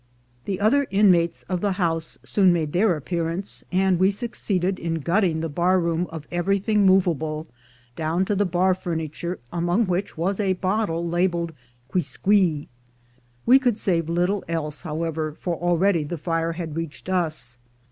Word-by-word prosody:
The 190 Hz, -2 st, -2 dB
other 265 Hz, +8 st, +3 dB
in 200 Hz, 0 st, +5 dB
mates 170 Hz, -1 st, +1 dB
of 180 Hz, -1 st, -2 dB
the 200 Hz, -2 st, +1 dB
house 165 Hz, -3 st, -2 dB
soon 190 Hz, -3 st, +4 dB
made 160 Hz, -4 st, -1 dB
their 185 Hz, 0 st, +3 dB
appearance, 170 Hz, +4 st, -3 dB
and 185 Hz, -1 st, +2 dB
we 190 Hz, +1 st, +5 dB
succeeded 195 Hz, -4 st, -1 dB
in 165 Hz, -1 st, -2 dB
gutting 170 Hz, +1 st, +1 dB
the 165 Hz, -, -1 dB
bar 175 Hz, +5 st, +2 dB
room 170 Hz, 0 st, 0 dB
of 160 Hz, -2 st, -8 dB
everything 195 Hz, +3 st, +2 dB
movable, 160 Hz, -5 st, +2 dB, 0.5 s
down 165 Hz, +4 st, 0 dB
to 205 Hz, -, 0 dB
the 200 Hz, 0 st, +2 dB
bar 180 Hz, +2 st, +2 dB
furniture, 170 Hz, 0 st, -4 dB, 0.2 s
among 175 Hz, +6 st, +1 dB
which 185 Hz, -1 st, -2 dB
was 185 Hz, +5 st, -1 dB
a 195 Hz, -2 st, +2 dB
bottle 185 Hz, -2 st, -1 dB
labelled 170 Hz, -1 st, 0 dB, 0.3 s
"Quisqui." 170 Hz, +1 st, +1 dB, 0.8 s
We 260 Hz, +3 st, +7 dB
could 245 Hz, -5 st, +1 dB
save 170 Hz, -6 st, 0 dB
little 180 Hz, +4 st, +1 dB
else, 150 Hz, -3 st, -3 dB
however, 155 Hz, -1 st, -3 dB
for 175 Hz, -2 st, -2 dB
already 175 Hz, +1 st, +2 dB
the 165 Hz, +4 st, -4 dB
fire 165 Hz, +1 st, -1 dB
had 165 Hz, -3 st, -5 dB
reached 165 Hz, -2 st, -6 dB
us. 155 Hz, -10 st, -1 dB
175 Hz, 155 wpm, -24 LUFS, 165-190 Hz, 0.8 s, We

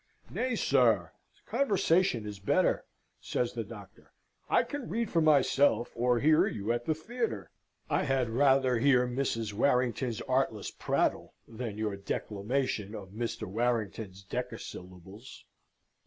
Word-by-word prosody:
"Nay, 255 Hz, -1 st, -1 dB
sir, 115 Hz, -, +3 dB, 0.3 s
conversation 190 Hz, -, +2 dB
is 105 Hz, -1 st, -7 dB
better," 145 Hz, -, +1 dB, 0.3 s
says -, -, -2 dB
the -, -, -3 dB
Doctor. -, -, -13 dB, 0.4 s
"I -, -, +4 dB
can 285 Hz, -4 st, -6 dB
read 230 Hz, 0 st, -2 dB
for 165 Hz, -, +3 dB
myself, 140 Hz, -5 st, +3 dB
or 120 Hz, +1 st, +2 dB
hear 155 Hz, +3 st, +4 dB
you 105 Hz, +1 st, -2 dB
at 120 Hz, 0 st, -2 dB
the 155 Hz, -, +1 dB
theatre. 230 Hz, +9 st, -4 dB, 0.4 s
I -, -, +1 dB
had 135 Hz, -3 st, +1 dB
rather 130 Hz, -1 st, +3 dB
hear 125 Hz, -1 st, +4 dB
Mrs. 120 Hz, -4 st, -2 dB
Warrington's 125 Hz, 0 st, +1 dB
artless 130 Hz, -5 st, -1 dB
prattle -, -, -1 dB
than 115 Hz, -2 st, -6 dB
your 105 Hz, -2 st, -2 dB
declamation 105 Hz, +2 st, -2 dB
of 95 Hz, -3 st, -8 dB
Mr. 115 Hz, +1 st, -4 dB
Warrington's 110 Hz, -2 st, -2 dB
decasyllables. 100 Hz, -2 st, -8 dB
120 Hz, 125 wpm, -30 LUFS, 105-140 Hz, 0.4 s, I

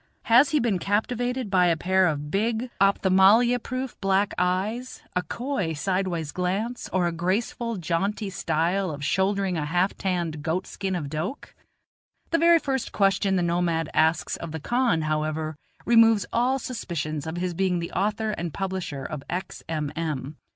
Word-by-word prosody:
has 250 Hz, +5 st, +5 dB
he 305 Hz, -, +2 dB
been 225 Hz, -7 st, +1 dB
captivated 245 Hz, +4 st, -1 dB
by 180 Hz, -2 st, +4 dB
a 165 Hz, -1 st, +2 dB
pair 185 Hz, +3 st, +3 dB
of 150 Hz, -2 st, -3 dB
big, 225 Hz, +4 st, 0 dB
opthamalmia 200 Hz, +5 st, +5 dB
proof, 255 Hz, +2 st, -4 dB
black 195 Hz, +1 st, +2 dB
eyes, 200 Hz, +8 st, -1 dB
a 180 Hz, -, +2 dB
coy 200 Hz, -, -3 dB
sidewise 175 Hz, -1 st, -1 dB
glance, 195 Hz, +7 st, -2 dB
or 185 Hz, -1 st, +1 dB
a 170 Hz, -, +1 dB
graceful, 205 Hz, +6 st, -1 dB
jaunty 190 Hz, +5 st, -1 dB
style 180 Hz, +3 st, 0 dB
of 145 Hz, -2 st, -5 dB
shouldering 190 Hz, 0 st, +1 dB
a 150 Hz, -, -1 dB
half 180 Hz, +5 st, +1 dB
tanned 170 Hz, -5 st, -2 dB
goat 165 Hz, +4 st, -1 dB
skin 190 Hz, -2 st, -3 dB
of 155 Hz, -5 st, -3 dB
doke? 160 Hz, -, -5 dB, 0.8 s
The 330 Hz, -, +3 dB
very 335 Hz, +1 st, +6 dB
first 270 Hz, -5 st, -2 dB
question 195 Hz, -1 st, +2 dB
the 180 Hz, -, +1 dB
nomad 170 Hz, -2 st, 0 dB
asks 160 Hz, +1 st, +2 dB
of 170 Hz, -, -7 dB
the 160 Hz, -, -4 dB
khan, 235 Hz, -, +1 dB
however, 155 Hz, 0 st, -1 dB, 0.3 s
removes 225 Hz, -4 st, +5 dB
all 250 Hz, +3 st, +2 dB
suspicions 165 Hz, -, -4 dB
of 160 Hz, +2 st, -4 dB
his 180 Hz, 0 st, -2 dB
being 185 Hz, 0 st, +1 dB
the 170 Hz, 0 st, -4 dB
author 215 Hz, +3 st, 0 dB
and 170 Hz, -5 st, -4 dB
publisher 185 Hz, -7 st, -4 dB
of 150 Hz, 0 st, -5 dB
X. 180 Hz, +2 st, -4 dB
M. 150 Hz, -3 st, -2 dB
M. 155 Hz, -3 st, -3 dB
185 Hz, 165 wpm, -25 LUFS, 165-220 Hz, 0.8 s, very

